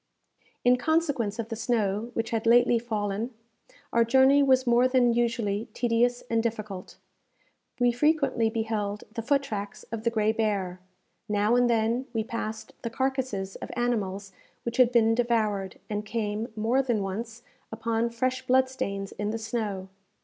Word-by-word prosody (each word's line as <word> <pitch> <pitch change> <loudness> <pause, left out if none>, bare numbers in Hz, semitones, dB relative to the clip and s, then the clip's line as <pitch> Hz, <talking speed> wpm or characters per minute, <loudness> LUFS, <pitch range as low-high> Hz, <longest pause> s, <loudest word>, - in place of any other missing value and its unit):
In 250 0 +6
consequence 280 -7 0
of 230 -1 -4
the 225 - -3
snow 220 -1 0
which 225 0 -2
had 225 -1 -1
lately 240 0 +5
fallen, 220 0 -3 0.6
our 235 - +5
journey 265 +4 +5
was 260 -2 +4
more 240 +1 +4
than 250 -2 +3
usually 230 -3 0
tedious 240 +1 +1
and 230 -1 +1
difficult. 215 -5 -5 0.8
We 245 0 +4
frequently 275 -3 +2
beheld 220 -2 -2
the 230 - -3
foot 275 +4 +2
tracks 205 -5 -5
of 225 -1 -4
the 235 - +3
gray 220 -2 +2
bear. 200 -5 -1 0.5
Now 210 +2 +2
and 245 0 +4
then 230 +3 +1
we 225 -1 0
passed 220 -1 -5
the 230 - -3
carcasses 255 -6 -2
of - - -7
animals 200 -5 -1 0.3
which 235 +1 -4
had 250 -2 +5
been 225 -2 +4
devoured, 215 -5 0
and 210 0 -3
came, 215 0 -2
more 230 +5 +2
than 240 -6 0
once, 225 +4 -5 0.3
upon 225 +1 -1
fresh 255 +2 -2
blood 260 +1 +4
stains 200 -6 -4
in 205 0 -3
the 225 - -2
snow. 215 -4 -3
230 Hz, 155 wpm, -27 LUFS, 210-245 Hz, 0.8 s, In